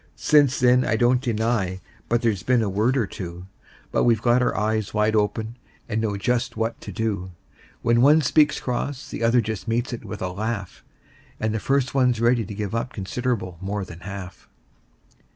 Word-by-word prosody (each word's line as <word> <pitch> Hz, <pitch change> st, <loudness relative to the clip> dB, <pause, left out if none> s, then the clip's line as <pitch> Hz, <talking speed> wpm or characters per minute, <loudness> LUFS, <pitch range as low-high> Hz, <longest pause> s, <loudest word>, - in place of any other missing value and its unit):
Since 145 Hz, -4 st, +3 dB
then 125 Hz, 0 st, +5 dB
I -, -, +1 dB
don't 125 Hz, +2 st, +3 dB
deny 110 Hz, -6 st, -1 dB, 0.3 s
but 120 Hz, +1 st, +1 dB
there's 110 Hz, -5 st, +1 dB
been 125 Hz, +3 st, +2 dB
a 105 Hz, -, -1 dB
word 110 Hz, +7 st, +1 dB
or 120 Hz, -, +2 dB
two; 90 Hz, -1 st, -7 dB, 0.5 s
But -, -, +2 dB
we've 115 Hz, -3 st, +3 dB
got 120 Hz, +2 st, +3 dB
our 125 Hz, -, 0 dB
eyes 110 Hz, 0 st, -1 dB
wide 105 Hz, +1 st, +2 dB
open, 110 Hz, +2 st, -1 dB, 0.3 s
and 110 Hz, +1 st, -1 dB
know 105 Hz, -2 st, -1 dB
just 120 Hz, +2 st, -1 dB
what 115 Hz, +1 st, -2 dB
to -, -, -7 dB
do: 100 Hz, -5 st, -3 dB, 0.5 s
When 120 Hz, 0 st, +3 dB
one 150 Hz, +4 st, +6 dB
speaks 150 Hz, +3 st, +3 dB
cross 130 Hz, +2 st, -3 dB
the -, -, -5 dB
other 115 Hz, +1 st, +4 dB
just 110 Hz, 0 st, -5 dB
meets 120 Hz, +3 st, -1 dB
it 120 Hz, -, -6 dB
with 105 Hz, -, -6 dB
a 95 Hz, -, -1 dB
laugh, 100 Hz, +1 st, -4 dB, 0.6 s
And 110 Hz, 0 st, -1 dB
the 110 Hz, -, -1 dB
first 135 Hz, +2 st, 0 dB
one's 125 Hz, -4 st, +2 dB
ready 120 Hz, 0 st, +3 dB
to 100 Hz, 0 st, -7 dB
give 105 Hz, -1 st, -4 dB
up 115 Hz, +2 st, -2 dB
considerable 100 Hz, -3 st, -3 dB
more 100 Hz, +1 st, -3 dB
than 85 Hz, -2 st, -11 dB
half. 95 Hz, -1 st, -9 dB
115 Hz, 190 wpm, -24 LUFS, 105-125 Hz, 0.6 s, one